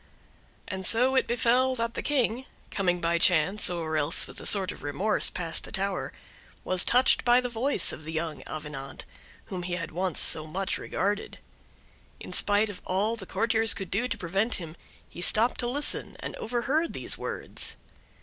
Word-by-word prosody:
And 190 - -4
it 185 - +3
so 255 +3 +5
befell 245 +2 +1
that 230 -1 -3
the - - -4
King, 255 -3 -1 0.2
coming 180 -3 0
by 170 0 +1
chance, 180 +4 +3
or 165 -3 -3
else 150 +2 +1
with - - -10
a - - +1
sort 195 -3 +4
of - - -11
remorse, 190 +9 +1
past 165 -3 -4
the - - -11
tower, 195 -1 -2 0.5
was 185 0 +2
touched 250 +2 +4
by 245 0 +5
the 250 -1 -3
voice 240 -2 0
of 155 - -9
the 160 - -7
young 160 -1 -4
Avenant, 150 -3 -7 0.4
whom 185 -2 -6
he 175 0 -5
had 165 -2 -5
once 180 0 -2
so 155 0 +3
much 190 +4 -2
regarded. 205 +2 -3 0.8
In - - -9
spite 205 +1 +2
of 185 - -11
all 205 +5 -1
the 195 -5 -9
courtiers 225 +2 +2
could 195 - -7
do 230 +6 +1
to - - -3
prevent 195 +5 -1
him, 165 -3 -7 0.3
he 175 - -10
stopped 220 +6 +5
to 240 - 0
listen, 285 +4 +1
and - - -6
overheard 260 +8 -1
these - - -1
words. - - -5
195 Hz, 180 wpm, -27 LUFS, 170-235 Hz, 0.8 s, so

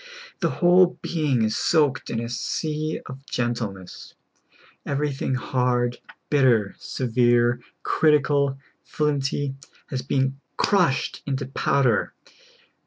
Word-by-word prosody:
The - - +1 0.2
whole 180 0 +5
being 145 -8 0
is 110 0 0
soaked 150 -5 +1
in 115 - -2
a 115 - -3
sea 155 +6 -3
of 135 0 -9
gentleness. 115 -7 -4 0.7
Everything 140 -2 -1
hard, 125 -1 0 0.3
bitter, 125 -8 +3
severe, 120 -1 +1 0.2
critical, 145 -3 +2 0.3
flint}'^, 145 -2 -1 0.4
has 130 -2 -2
been 135 +1 -1 0.2
crushed 180 -10 +1
into 135 0 -2
powder. 130 -3 +1
135 Hz, 100 wpm, -24 LUFS, 120-145 Hz, 0.7 s, whole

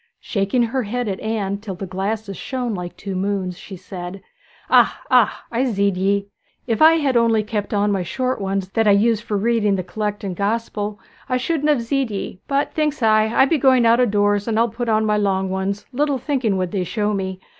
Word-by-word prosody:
Shaking 205 +4 0
her 245 +3 -1
head 245 +2 -3
at 195 -2 -3
Anne 205 -3 -2
till 205 -3 -6
the 195 - -6
glasses 195 +2 -3
shone 250 0 -3
like 180 -2 -6
two 200 -1 -5
moons, 190 -1 -2
she 190 +2 -10
said, 185 +1 -8 0.4
'Ah, - - +4
ah; - - +3
I 245 +2 +1
zeed 200 -5 +1
ye! 200 +2 0 0.4
If 225 -3 -1
I 320 +1 +8
had 290 -5 +1
only 230 -2 +3
kept 210 -1 -3
on 205 0 +1
my 195 -2 0
short 255 +7 -2
ones 195 -1 -2
that 225 +2 +1
I 205 - +6
use 215 +1 +3
for 210 -2 -2
reading 210 -1 +2
the 185 - -2
Collect 210 +2 -4
and 190 -3 -3
Gospel 210 0 -2 0.3
I 255 - +2
shouldn't 300 +3 0
have 280 -6 +2
zeed 270 +1 0
ye; 195 -2 -5
but 280 0 0
thinks 300 -4 -1
I, 215 -1 +4
I 235 +4 +4
be 300 +2 +1
going 260 -2 +4
out 230 +1 +5
o' 250 - +4
doors, 205 0 +1
and 220 -1 0
I'll 230 +1 +3
put 235 +2 -4
on 220 0 +2
my 210 -1 +2
long 190 -2 0
ones, 195 +2 -2
little 285 +1 +1
thinking 255 -6 -1
what 185 -2 -2
they'd 190 -3 -1
show 210 +2 -1
me. 190 -1 -3
210 Hz, 220 wpm, -21 LUFS, 195-235 Hz, 0.4 s, I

